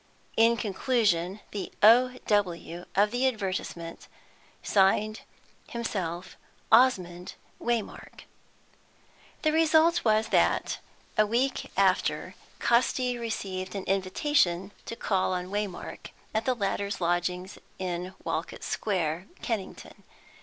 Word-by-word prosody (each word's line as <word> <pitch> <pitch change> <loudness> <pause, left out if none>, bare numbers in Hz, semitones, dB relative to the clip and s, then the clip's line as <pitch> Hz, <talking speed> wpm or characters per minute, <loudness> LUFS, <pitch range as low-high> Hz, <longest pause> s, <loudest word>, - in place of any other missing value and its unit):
In 230 +1 +5
conclusion, 205 -3 0
the 205 - -5
"O. 250 +4 +6
W." 175 -4 0
of 205 +2 +4
the 250 +2 +2
advertisement 185 -7 -4 0.6
signed 210 +2 +2 0.5
himself 185 -6 -4 0.3
Osmond 185 -8 +3 0.3
Waymark. 235 -3 -3 1.2
The 310 - +3
result 320 +1 +4
was 220 -1 +3
that, - - +2 0.4
a 215 - +5
week 250 +5 0
after, - - +2 0.3
Casti 245 +1 +2
received 195 -5 -4
an 195 - -3
invitation 190 - +1 0.2
to 230 - -4
call 190 -4 0
on 180 +1 -3
Waymark, 205 -3 -4 0.2
at 220 +1 0
the 255 - +2
latter's 200 -1 -2
lodgings 180 +1 -1 0.2
in 180 0 -4
Walcot - - -3
Square, 180 -3 -1 0.2
Kennington. 220 -5 -5
205 Hz, 105 wpm, -28 LUFS, 185-235 Hz, 1.2 s, O